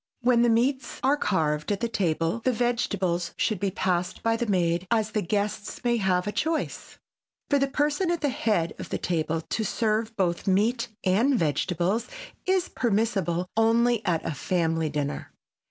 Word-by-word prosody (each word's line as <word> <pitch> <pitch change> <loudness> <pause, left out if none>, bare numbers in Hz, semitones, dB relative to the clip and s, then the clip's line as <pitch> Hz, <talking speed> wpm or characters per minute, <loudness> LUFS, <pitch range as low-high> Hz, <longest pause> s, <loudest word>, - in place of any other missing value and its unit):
When 245 -1 +4
the 240 - +4
meats 245 +3 +1
are 270 +2 +4
carved 155 - 0
at 200 - 0
the 235 - 0
table 170 -2 0
the 255 - +3
vegetables 205 -8 -1
should 215 -5 0
be 200 0 0
passed 180 -2 -1
by 230 0 +2
the 235 +1 -2
maid, 175 -2 +1
as 220 -2 +1
the 215 - 0
guests 205 +4 -2
may 240 -1 +2
have 185 -3 +1
a 205 - -1
choice. 320 +7 -2 0.5
For 285 - +4
the 275 - +2
person 295 +5 0
at 345 -1 0
the 290 - +1
head 220 - 0
of - - -7
the - - -1
table 165 -2 -1
to 220 +7 -3
serve 220 +1 0
both 175 -1 0
meat 230 +6 +2 0.2
and 225 +9 +3
vegetables 175 +6 0 0.4
is 375 -1 +2
permissible 200 -6 0
only 230 +1 +3
at 175 -5 0
a - - -1
family 165 +1 0
dinner. 145 -1 -3
210 Hz, 170 wpm, -26 LUFS, 175-240 Hz, 0.5 s, When